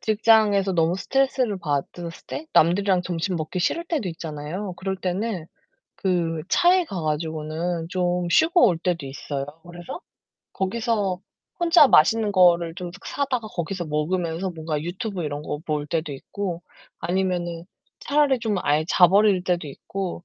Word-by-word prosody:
직장에서 215 -3 +3
너무 170 +1 +2
스트레스를 260 -3 0
받았을 165 +2 -3 0.2
때 315 - -6
남들이랑 180 +2 +3
점심 175 +1 -2
먹기 160 +3 -3
싫을 335 - 0
때도 305 - -2
있잖아요. 165 +4 -5
그럴 190 +2 -3
때는 185 -1 -3 0.5
그 170 -4 -1
차에 360 +1 +4
가 180 -4 -5
가지고는 160 +2 -2
좀 180 -2 0
쉬고 330 - +5
올 170 - 0
때도 170 -3 -1
있어요. 135 +1 -5 0.3
그래서 175 - -8 0.5
거기서 200 -2 -1 0.4
혼자 340 -3 +7
맛있는 215 +3 +4
거를 175 -3 +4
좀 180 -1 -5
사다가 260 -5 -2
거기서 175 0 -4
먹으면서 165 +4 -1
뭔가 160 -2 -3
유튜브 185 +2 -4
이런 145 -1 -4
거 150 - -4
볼 150 -1 -1
때도 160 -1 -2
있고 175 +5 -5 0.4
아니면은 175 -2 -1 0.4
차라리 285 -3 +2
좀 220 -3 -1
아예 150 +2 +2
자버릴 195 +1 +5
때도 175 -4 0
있고 180 +4 -6
180 Hz, 315 characters per minute, -24 LUFS, 165-205 Hz, 0.5 s, 혼자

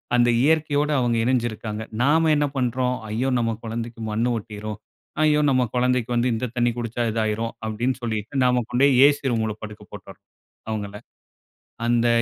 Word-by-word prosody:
அந்த 120 0 +4
இயற்கையோட 150 0 +2
அவுங்க 120 -2 +1
இணைஞ்சு 125 -1 +1
இருக்காங்க. 110 0 -6 0.2
நாம 160 +4 +3
என்ன 150 -1 +2
பண்றோம்? 125 0 0
"ஐயோ 120 +5 -1
நம்ம 115 -1 0
கொழந்தைக்கு 115 0 -5
மண்ணு 115 +3 0
ஒட்டிரும். 105 0 -6 0.5
ஐயோ 150 -1 +4
நம்ம 130 -1 +3
கொழந்தைக்கு 125 -1 +1
வந்து 120 +1 +2
இந்த 115 +3 -2
தண்ணீ 120 -1 +2
குடிச்சா 120 0 -2
இது 115 - -2
ஆயிரும்" 110 +2 -2
அப்டின்னு 120 +4 -1
சொல்லிட்டு, 115 +3 -3
நாம 125 -1 +3
கொண்டோய் 130 +3 +4
ஏ - - +9
சி 135 -4 -2
ரூம்ல 110 -2 -1
படுக்க 105 -1 -8
போட்டுர்றோம், - - -12 0.5
அவுங்கள. 105 -2 -4 0.9
அந்த 120 0 +3
120 Hz, 160 wpm, -23 LUFS, 110-130 Hz, 0.9 s, ஏ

